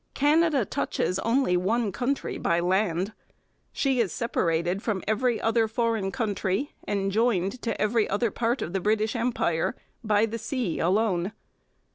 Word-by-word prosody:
Canada 295 -3 +3
touches 180 0 -1
only 230 -4 +2
one 205 +4 +1
country 260 +5 -2
by 170 0 +1
land. 185 +2 0 0.6
She 270 -3 0
is 220 -6 +1
separated 175 -5 0
from 210 -5 -2
every 225 +2 +1
other 225 0 +2
foreign 220 -3 0
country 215 +2 -1 0.2
and 195 -1 0
joined 220 0 +1
to 230 - -3
every 215 0 +2
other 210 +2 0
part 235 +4 0
of 170 - -6
the 195 - +1
British 215 +3 +1
Empire 225 -9 0 0.3
by 215 0 +3
the 225 +1 -5
sea 225 - -2
alone. 190 +1 +1
220 Hz, 145 wpm, -26 LUFS, 190-235 Hz, 0.6 s, Canada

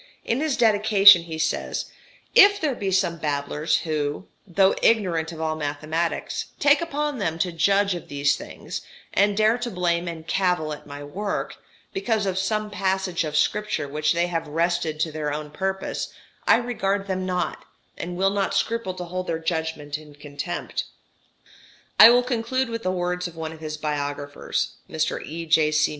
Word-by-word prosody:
In 235 - 0
his 305 -3 0
dedication 205 -5 +7
he 160 -1 -6
says: 160 0 -1 0.5
"If 405 0 +7
there 300 -4 0
be 200 -5 -3
some 185 -3 +1
babblers 150 +1 0
who, 150 +1 -2 0.2
though 190 +1 +4
ignorant 175 -8 +2
of 165 - -9
all 160 -1 -1
mathematics, 155 +3 -2
take 290 +1 +5
upon 295 -4 -2
them 165 -5 -1
to 180 +2 0
judge 195 +4 +2
of 175 - -7
these 145 0 +1
things, - - -7 0.3
and 200 +1 +3
dare 220 +3 +3
to 245 0 -3
blame 175 -3 0
and 165 -2 -6
cavil 180 -4 0
at 150 - -10
my 145 0 -8
work, 200 +8 -4 0.4
because 225 - 0
of 190 -1 -1
some 215 +2 -1
passage 190 -3 0
of 155 -1 -2
Scripture 210 -6 0
which 150 +2 0
they 170 +1 +1
have 165 -2 -3
wrested 165 0 0
to 160 - 0
their 150 -1 -3
own 150 0 -5
purpose, 190 +4 -3 0.4
I - - +7
regard 205 -5 -1
them 185 -1 -2
not, 180 -1 -2 0.3
and 175 +1 -5
will 195 +1 +2
not 200 -1 -1
scruple 230 -5 -1
to 180 - -5
hold 185 +1 -4
their 165 - -1
judgment 160 -3 -3
in 150 -2 -15
contempt." 145 +4 -5 1.1
I - - +12
will 245 +1 +5
conclude 250 +1 -1
with 230 0 -4
the 185 - -1
words 180 0 -1
of 170 - -11
one 160 -1 -5
of 160 - -11
his 155 -1 -5
biographers 145 -1 -3
(Mr. 155 0 -1
E.J.C. 155 -1 +2
175 Hz, 170 wpm, -24 LUFS, 155-200 Hz, 1.1 s, I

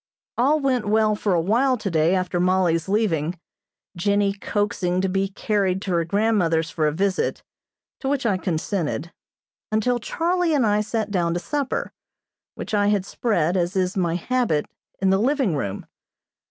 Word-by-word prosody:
All 280 +6 +3
went 255 -6 0
well 215 0 +3
for 205 -3 0
a - - +3
while 245 +9 +2
today 170 -4 +1
after 180 -1 -1
Mollie's 180 -2 +2
leaving, 180 -6 0 0.6
Jennie 200 +2 +1
coaxing 200 -3 -1
to 190 - +1
be 195 +1 0
carried 195 -1 0
to 190 - -3
her 170 -1 +1
grandmother's 170 -5 +1
for 155 -2 0
a - - +1
visit, 190 +4 -1 0.6
to 270 - -2
which 275 -3 -1
I 205 -5 +2
consented, 170 -2 -2 0.6
until 240 +3 +1
Charlie 340 +5 0
and 265 -5 +3
I 210 0 +2
sat 220 0 -2
down 170 -3 0
to - - 0
supper, 285 +6 -2 0.6
which - - -7
I 205 -1 +3
had 205 -2 +1
spread, 185 -7 0
as 180 +1 0
is 185 -1 0
my 175 -3 0
habit, 210 -5 0 0.3
in 190 0 +2
the 195 - +3
living 255 - +1
room. 100 -8 -4
195 Hz, 165 wpm, -23 LUFS, 175-220 Hz, 0.6 s, All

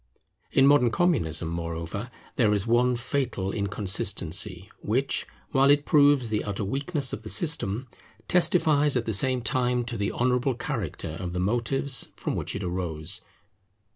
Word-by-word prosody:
In 135 - +4
modern 140 -4 +5
Communism, 110 - 0
moreover, 85 +6 -5 0.3
there 110 -4 +3
is 100 0 -1
one 120 +2 +3
fatal 120 -6 -2
inconsistency, 95 -1 0
which 130 +6 -1 0.2
while 135 0 +4
it 145 0 +4
proves 145 -5 +4
the 105 - 0
utter 105 0 -3
weakness 140 - -2
of - - -4
the 110 - -8
system, 130 - 0 0.4
testifies 150 -6 +3
at 115 - -2
the 110 - -2
same 130 +3 +2
time 125 -1 0
to 120 -1 -4
the 100 -1 -1
honourable 125 +1 0
character 95 - -4
of 90 -1 -5
the 90 - -2
motives 120 +7 0
from - - -3
which - - -3
it 100 - -4
arose. 85 -4 -2
120 Hz, 150 wpm, -26 LUFS, 95-135 Hz, 0.4 s, modern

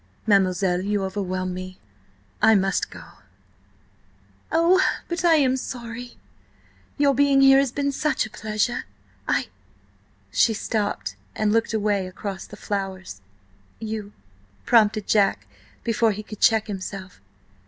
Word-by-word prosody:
"Mademoiselle–you 195 0 +2
overwhelm 185 -1 -3
me–I 100 - -2
must 195 -1 +1
go." - - -11 1.5
"Oh, 340 +3 +4 0.3
but 345 +1 -3
I 335 -2 +6
am 265 -4 +3
sorry. 245 -2 -7 0.8
Your 285 -1 +4
being 280 0 +4
here 270 0 +7
has 275 -3 +1
been 280 +1 -1
such 300 -1 0
a 215 - -10
pleasure! 215 +3 -2 0.4
I—"She 225 - -3
stopped, 205 - -2 0.2
and 210 -1 +1
looked 225 0 +1
away 205 -3 0
across 190 +1 -6
the - - -11
flowers. 190 - -5 0.6
"You?" 215 -2 -5 0.5
prompted 215 -3 +4
Jack 195 - +2 0.4
before 230 -1 +2
he 215 +2 -7
could 215 -1 -10
check 220 -2 +4
himself. 190 - -7
210 Hz, 115 wpm, -24 LUFS, 190-240 Hz, 1.5 s, here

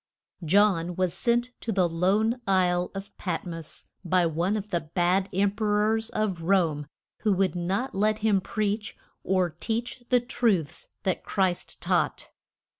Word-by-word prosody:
John 180 -1 +3
was 185 -1 0
sent 240 +1 +1
to 230 - -2
the 185 -4 +3
lone 205 +8 +1
isle 180 -2 +2
of 195 +1 -7
Pat 180 -2 -3
mos 165 -3 -7 0.2
by 180 0 +3
one 170 +6 0
of 210 0 -6
the 175 - +2
bad 175 +4 0
Em 195 +1 +2
pe 215 +2 -5
rors 215 +2 +2
of 195 -6 -1
Rome, 165 -5 +1 0.3
who 215 - +1
would 190 -1 +1
not 190 +9 -1
let 210 +2 +2
him 210 -3 +2
preach 210 +1 -2 0.3
or 185 -2 +1
teach 240 +2 -3
the 250 - +5
truths 220 - 0 0.2
that 185 - -1
Christ 190 -3 -1
taught. - - 0
195 Hz, 155 wpm, -27 LUFS, 175-215 Hz, 0.3 s, the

